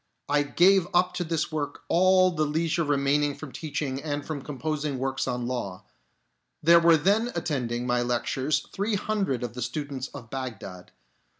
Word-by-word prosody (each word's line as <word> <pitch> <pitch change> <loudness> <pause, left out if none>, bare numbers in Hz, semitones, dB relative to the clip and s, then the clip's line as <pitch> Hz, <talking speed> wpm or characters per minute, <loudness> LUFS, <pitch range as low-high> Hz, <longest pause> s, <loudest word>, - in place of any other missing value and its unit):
I 145 +1 +3
gave 180 +5 +4
up 180 +1 +3
to 180 - 0
this 165 -1 -2
work 145 -2 -4
all 185 +1 +4
the 155 -3 0
leisure 160 +3 0
remaining 145 0 +1
from 155 -4 -9
teaching 140 -3 -4
and 145 -1 -3
from 155 -3 -4
composing 150 0 -3
works 135 +1 -2
on 125 -1 -2
law. 120 -7 -4 0.8
There 170 +2 +7
were 170 -1 +6
then 205 +9 +2
attending 125 -6 -2
my 120 0 +1
lectures 125 +4 0
three 205 +2 0
hundred 195 - -1
of 120 - -4
the 125 - -6
students 135 +1 -4
of 115 - -11
Bagdad. 110 -9 -6
145 Hz, 165 wpm, -26 LUFS, 130-170 Hz, 0.8 s, There